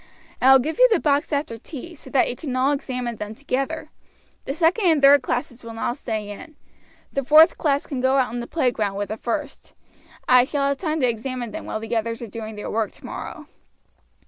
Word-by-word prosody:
I 265 Hz, -, +7 dB
will 265 Hz, -, +9 dB
give 310 Hz, -, -3 dB
you -, -, +7 dB
the 435 Hz, -, +4 dB
box 290 Hz, +1 st, +1 dB
after 280 Hz, -6 st, -2 dB
tea, 325 Hz, +7 st, -9 dB
so 305 Hz, -, -13 dB
that 270 Hz, -, +3 dB
you 245 Hz, -, -3 dB
can 260 Hz, 0 st, -5 dB
all 260 Hz, +2 st, +2 dB
examine 250 Hz, -4 st, -3 dB
them 210 Hz, +1 st, -6 dB
together. 280 Hz, +4 st, -3 dB, 0.5 s
The 275 Hz, -, -3 dB
second 350 Hz, +5 st, +2 dB
and 320 Hz, -3 st, +4 dB
third 280 Hz, 0 st, +7 dB
classes 245 Hz, -1 st, -3 dB
will 230 Hz, -1 st, -8 dB
now 225 Hz, -, -1 dB
stay 220 Hz, -6 st, -4 dB
in; 305 Hz, +9 st, -11 dB, 0.6 s
the 275 Hz, -, -1 dB
fourth 310 Hz, +5 st, +7 dB
class 285 Hz, -2 st, +1 dB
can 265 Hz, -3 st, -4 dB
go 260 Hz, +1 st, +3 dB
out 250 Hz, -4 st, +1 dB
in 245 Hz, -, -3 dB
the 235 Hz, -, -5 dB
playground 230 Hz, -10 st, 0 dB
with 205 Hz, 0 st, -3 dB
the 215 Hz, -, -4 dB
first. 275 Hz, +5 st, -5 dB, 0.5 s
I 250 Hz, -1 st, +7 dB
shall 275 Hz, +1 st, -1 dB
have 280 Hz, 0 st, 0 dB
time 315 Hz, -2 st, -2 dB
to 255 Hz, -, +4 dB
examine 240 Hz, 0 st, -3 dB
them -, -, -7 dB
while 220 Hz, -, -3 dB
the 225 Hz, +1 st, -4 dB
others 230 Hz, 0 st, -1 dB
are -, -, -6 dB
doing 220 Hz, +1 st, -7 dB
their 210 Hz, -, -6 dB
work 220 Hz, -1 st, -1 dB
tomorrow." -, -, -8 dB
260 Hz, 220 wpm, -23 LUFS, 230-290 Hz, 0.6 s, will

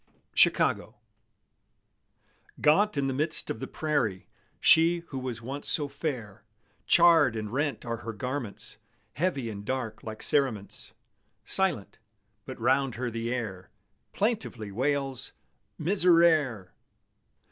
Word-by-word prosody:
CHICAGO -, -, +2 dB, 1.6 s
Gaunt 195 Hz, +5 st, +3 dB
in 140 Hz, -, +1 dB
the 135 Hz, -, -1 dB
midst 155 Hz, +4 st, +1 dB
of -, -, -5 dB
the -, -, -5 dB
prairie, 130 Hz, -12 st, -1 dB, 0.3 s
She 170 Hz, +1 st, +5 dB
who 135 Hz, -, -5 dB
was 125 Hz, -3 st, -5 dB
once 135 Hz, +4 st, -5 dB
so 145 Hz, -2 st, 0 dB
fair; 120 Hz, -9 st, -5 dB, 0.4 s
Charred 160 Hz, -6 st, +5 dB
and 110 Hz, 0 st, -5 dB
rent 145 Hz, 0 st, -2 dB
are 115 Hz, -1 st, -3 dB
her 115 Hz, 0 st, -6 dB
garments, 125 Hz, -1 st, -5 dB, 0.4 s
Heavy 150 Hz, -6 st, -1 dB
and 100 Hz, -2 st, -6 dB
dark 120 Hz, -2 st, -4 dB
like 110 Hz, -1 st, -6 dB
cerements; 125 Hz, -9 st, 0 dB, 0.5 s
Silent, 175 Hz, -, +1 dB, 0.5 s
but 130 Hz, -, -8 dB
round 130 Hz, +1 st, +1 dB
her 125 Hz, 0 st, -3 dB
the 115 Hz, +1 st, -3 dB
air 110 Hz, -7 st, -4 dB, 0.4 s
Plaintively 200 Hz, -, -2 dB
wails, 135 Hz, +3 st, -1 dB, 0.4 s
"Miserere!" 160 Hz, -, +3 dB
130 Hz, 115 wpm, -28 LUFS, 115-155 Hz, 1.6 s, She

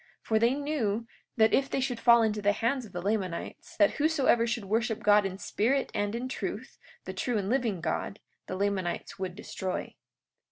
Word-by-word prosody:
43:10 -, -, -28 dB, 0.2 s
For 220 Hz, -1 st, +4 dB
they 235 Hz, +3 st, +4 dB
knew 240 Hz, -7 st, -1 dB, 0.3 s
that 220 Hz, -1 st, +4 dB
if 275 Hz, 0 st, +3 dB
they -, -, -1 dB
should 255 Hz, -3 st, -1 dB
fall 235 Hz, -1 st, +6 dB
into 215 Hz, -1 st, 0 dB
the 205 Hz, 0 st, +3 dB
hands 240 Hz, +4 st, 0 dB
of -, -, -17 dB
the 175 Hz, 0 st, -5 dB
Lamanites, 195 Hz, -4 st, -3 dB
that 205 Hz, -1 st, +5 dB
whosoever 285 Hz, -6 st, +3 dB
should 230 Hz, -2 st, -2 dB
worship 225 Hz, +2 st, -1 dB
God 205 Hz, -1 st, +5 dB
in 190 Hz, 0 st, -7 dB
spirit 255 Hz, +7 st, 0 dB
and 205 Hz, +1 st, -1 dB
in 245 Hz, +2 st, -3 dB
truth, 260 Hz, -, -5 dB, 0.3 s
the -, -, -5 dB
true 245 Hz, -3 st, -1 dB
and 200 Hz, -, -1 dB
the -, -, 0 dB
living 235 Hz, -9 st, 0 dB
God, 195 Hz, +4 st, -2 dB, 0.3 s
the 185 Hz, -, -4 dB
Lamanites 195 Hz, -1 st, -2 dB
would 185 Hz, -2 st, -4 dB
destroy. 190 Hz, -2 st, -4 dB
220 Hz, 200 wpm, -29 LUFS, 200-245 Hz, 0.3 s, fall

